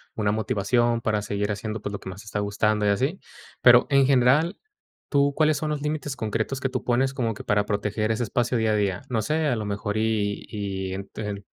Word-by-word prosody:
una 105 -2 +1
motivación 115 +2 +1
para 110 -2 0
seguir 105 0 -2
haciendo, 105 +1 -4
pues, 100 - -4
lo 100 - -5
que - - -8
más 95 +2 -8
te - - -17
está 105 0 -3
gustando 105 +1 +1
y 100 - +3
así. 135 - 0 0.4
Pero, 120 -1 +7
en 140 -1 +5
general, 140 +7 +3 0.5
tú 140 -1 +3
¿cuáles 155 -1 +3
son 155 +1 -2
los 150 -1 -2
límites 150 -2 -3
concretos 115 +4 -2
que 135 - 0
tú - - -4
pones 130 +2 +1
como 115 -4 -1
que 105 - -9
para 105 0 +1
proteger 105 +1 -1
ese 110 - -1
espacio 120 +3 0
día 110 -1 +1
a - - +2
día? 100 -2 0
No 115 -3 0
sé, 155 +6 0
a 125 -5 +1
lo 110 - -3
mejor 105 +1 -3
y 110 -2 0
y 95 -3 -4
ent 100 +1 -8
el, 100 -2 -5
110 Hz, 230 wpm, -25 LUFS, 105-130 Hz, 0.5 s, Pero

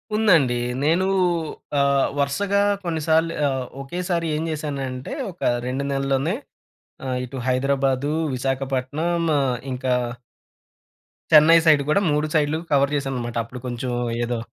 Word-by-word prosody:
ఉందండి. 175 - +4 0.3
నేను 170 +5 +2 0.7
ఆహ్, 140 -1 +3
వరసగా 200 +9 +1 0.2
కొన్నిసార్లు 160 -1 +1 0.2
ఆహ్, 130 -1 -2 0.2
ఒకేసారి 175 +3 -2
ఏం 155 - -2
చేశానంటే 140 -4 -4 0.2
ఒక 175 - -21 0.3
2 130 +2 -2
నెలల్లోనే 135 +5 0 0.7
ఆహ్, 130 -1 -1
ఇటు 130 +2 -7
హైదరాబాదు. 135 +2 +1 0.2
విశాఖపట్నం. 135 +6 -1 0.2
ఆహ్, 130 -3 0 0.2
ఇంకా 125 0 0 1.4
చెన్నై 155 +2 +8
సైడ్ 150 -3 +6
కూడా 175 +6 +3
3 150 +1 +1
సైడ్‌లు 150 +1 +2
కవర్ 140 0 +3
చేశానన్నమాట. 130 -4 -3
అప్పుడు 125 +2 -9
కొంచెం 125 +1 -3 0.3
ఏదో 120 -1 -2
140 Hz, 115 wpm, -23 LUFS, 130-160 Hz, 1.4 s, చెన్నై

